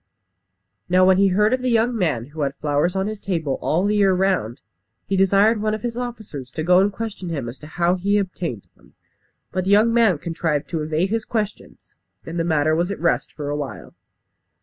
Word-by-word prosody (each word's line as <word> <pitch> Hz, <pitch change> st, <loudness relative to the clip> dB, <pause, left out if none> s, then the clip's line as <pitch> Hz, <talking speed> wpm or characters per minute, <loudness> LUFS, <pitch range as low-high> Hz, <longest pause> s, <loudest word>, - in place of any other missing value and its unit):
Now 185 Hz, +1 st, +5 dB
when 190 Hz, 0 st, +5 dB
he 200 Hz, -, +5 dB
heard 210 Hz, +5 st, +3 dB
of 255 Hz, -, 0 dB
the 255 Hz, -, 0 dB
young 235 Hz, +1 st, +2 dB
man 155 Hz, -, 0 dB
who 155 Hz, -, -5 dB
had 140 Hz, -1 st, -1 dB
flowers 150 Hz, +5 st, 0 dB
on 190 Hz, 0 st, 0 dB
his 215 Hz, 0 st, -5 dB
table 160 Hz, -8 st, -2 dB
all 170 Hz, +5 st, +1 dB
the 210 Hz, +1 st, +1 dB
year 195 Hz, -2 st, +4 dB
round, 180 Hz, -, 0 dB, 0.5 s
he 195 Hz, -, -1 dB
desired 200 Hz, +3 st, +3 dB
one 215 Hz, 0 st, 0 dB
of 215 Hz, -, -9 dB
his 240 Hz, -1 st, -3 dB
officers 220 Hz, -, -6 dB
to 155 Hz, -, -3 dB
go 180 Hz, +2 st, +5 dB
and 200 Hz, +2 st, +3 dB
question 205 Hz, -4 st, -6 dB
him 140 Hz, -7 st, -3 dB
as 120 Hz, +3 st, -8 dB
to 150 Hz, -, -11 dB
how 170 Hz, +2 st, +1 dB
he 200 Hz, +3 st, +1 dB
obtained 175 Hz, -, -3 dB
them. -, -, -24 dB, 0.6 s
But 185 Hz, 0 st, -2 dB
the -, -, -1 dB
young 215 Hz, +3 st, +5 dB
man 225 Hz, -8 st, +4 dB
contrived 160 Hz, -2 st, -2 dB
to 165 Hz, -3 st, -1 dB
evade 160 Hz, +5 st, -1 dB
his 225 Hz, 0 st, 0 dB
questions, 215 Hz, -2 st, -5 dB, 0.3 s
and 165 Hz, +1 st, -5 dB
the -, -, +1 dB
matter 155 Hz, -2 st, +2 dB
was 170 Hz, +3 st, 0 dB
at 200 Hz, -, -4 dB
rest 145 Hz, -6 st, 0 dB
for 145 Hz, -2 st, -6 dB
a 145 Hz, -, -1 dB
while. 140 Hz, -7 st, -6 dB
185 Hz, 215 wpm, -22 LUFS, 155-210 Hz, 0.6 s, Now